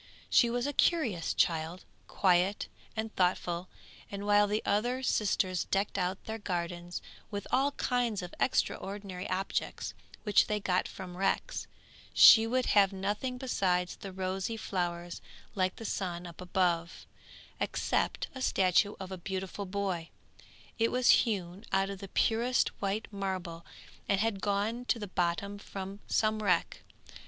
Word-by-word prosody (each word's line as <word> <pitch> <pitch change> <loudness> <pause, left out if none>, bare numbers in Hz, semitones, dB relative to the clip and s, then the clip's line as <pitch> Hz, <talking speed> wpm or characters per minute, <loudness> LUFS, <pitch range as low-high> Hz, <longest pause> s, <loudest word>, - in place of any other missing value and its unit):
She 240 - +6
was 240 +1 -1
a 290 - -1
curious 250 - +2
child, 165 +2 0 0.2
quiet 185 +1 +2 0.3
and 220 0 -4
thoughtful, 180 -1 0 0.4
and 200 0 -5
while 205 0 +5
the 210 +1 -1
other 240 +6 +1
sisters 190 -6 +1
decked 195 +1 0
out 185 0 -2
their 220 0 -4
gardens 175 -2 -4 0.3
with 205 -2 -4
all 275 +2 +2
kinds 240 -8 0
of 175 - -8
extraordinary 195 -6 -1
objects 190 +1 -2 0.3
which 210 -3 +4
they 210 0 0
got 185 -2 +1
from 180 -2 -8
wrecks, 195 +1 -1 0.5
she 225 0 +9
would 255 +2 +1
have 200 -2 +5
nothing 205 +6 -2
besides 185 -8 0
the 195 - -8
rosy 190 +3 -2
flowers 175 -4 -3 0.3
like 185 -2 0
the 225 - -8
sun 180 -4 -3
up 170 0 -10
above, 175 -2 0 0.5
except - - 0
a 260 - -7
statue 195 -2 +3
of 190 -1 -7
a 190 - -5
beautiful 190 +2 -4
boy. 185 -4 -2 0.7
It 230 0 +3
was 250 -1 +2 0.2
hewn 190 -1 -4
out 195 0 +2
of 195 - -7
the 195 - -7
purest 235 +5 +2
white 200 +2 -1
marble 185 -4 -4 0.5
and 195 - +3
had 210 -2 0
gone 210 +4 0
to 245 - +1
the 210 - -4
bottom 190 +2 -1
from 195 0 -7
some 215 0 +1
wreck. 210 - +1
195 Hz, 145 wpm, -31 LUFS, 180-215 Hz, 0.7 s, she